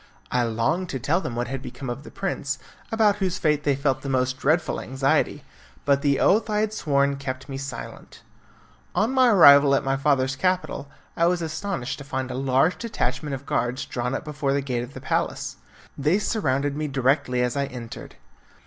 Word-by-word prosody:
I 125 - +2
longed 120 +11 0
to 135 - -3
tell 165 +9 +1
them 120 - -4
what 120 +1 -2
had 135 +1 -4
become 135 - -8
of 120 +3 -4
the - - -11
prince, 180 -8 -3 0.3
about 215 -2 +3
whose 185 -3 -1
fate 150 -2 +1
they 145 -2 +2
felt 135 0 0
the 140 - -5
most 130 0 0
dreadful 160 +3 +1
anxiety, 135 +1 0 0.4
but 140 -1 +3
the 140 -1 +2
oath 220 +3 +3
I 210 0 +1
had 215 0 -1
sworn 140 -7 +1
kept 130 -1 -5
me 135 -2 -5
silent. 135 -4 -8 0.7
On 220 +4 +2
my 260 -2 +5
arrival 140 -8 +8
at - - +1
my 135 0 +1
father's 135 -2 +1
capital, 180 -3 -1 0.3
I 170 - +3
was 175 -1 +1
astonished 160 -4 -3
to - - -7
find 130 -2 -3
a - - -4
large 135 +6 +2
detachment 155 -10 -2
of 135 +1 -10
guards 120 +1 -1
drawn 125 +1 -2
up - - -5
before 145 -2 -1
the 140 - +1
gate 125 -3 -2
of 125 +3 -8
the - - -7
palace; - - -2 0.4
they 150 +7 +2
surrounded 145 - 0
me 155 0 -2
directly 130 -2 +1
I 140 +3 -1
entered. 120 -4 -9
140 Hz, 195 wpm, -24 LUFS, 130-165 Hz, 0.7 s, arrival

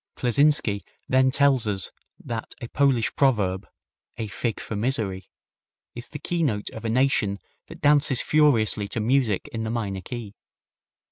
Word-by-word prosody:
Kleczynski 125 -5 +2 0.3
then 130 0 +4
tells 135 -4 +3
us 100 -2 -1 0.3
that 115 -1 -6
a 120 - -6
Polish 135 -4 +1
proverb, 100 -9 +1 0.5
"A 110 - -3
fig 110 +1 -3
for 110 - -5
misery," 105 -5 -2 0.6
is 120 0 -9
the 150 - -6
keynote 150 -12 -1
of 110 - -9
a 115 - -2
nation 115 -5 +2 0.3
that - - -12
dances 145 -3 +3
furiously 115 -9 +2
to 105 - -3
music 115 -3 +1
in 115 - -5
the 110 - -3
minor 105 -5 -3
key. 115 -1 -7
115 Hz, 145 wpm, -25 LUFS, 105-135 Hz, 0.6 s, then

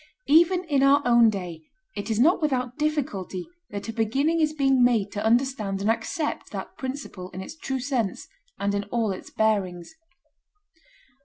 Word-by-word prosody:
Even 345 +4 +4
in 290 -6 +1
our 280 +1 +5
own 235 -2 +6
day 180 -6 -5 0.3
it 205 +2 -5
is 220 -1 0
not 330 +8 +4
without 255 -5 -1
difficulty 260 - -2 0.2
that 200 +1 -6
a 225 - -4
beginning 270 +9 +1
is 305 -1 +2
being 270 -4 +3
made 225 -5 +2
to 205 - -4
understand 225 -4 +1
and 205 +3 +2
accept 300 +6 -3
that - - -7
principle 260 -9 -6
in 185 - -5
its - - -9
true 270 -4 -3
sense 245 -6 -2 0.3
and 200 0 -1
in 200 0 -1
all 225 0 -1
its 185 - -7
bearings. 195 - -1
235 Hz, 165 wpm, -25 LUFS, 200-280 Hz, 0.3 s, own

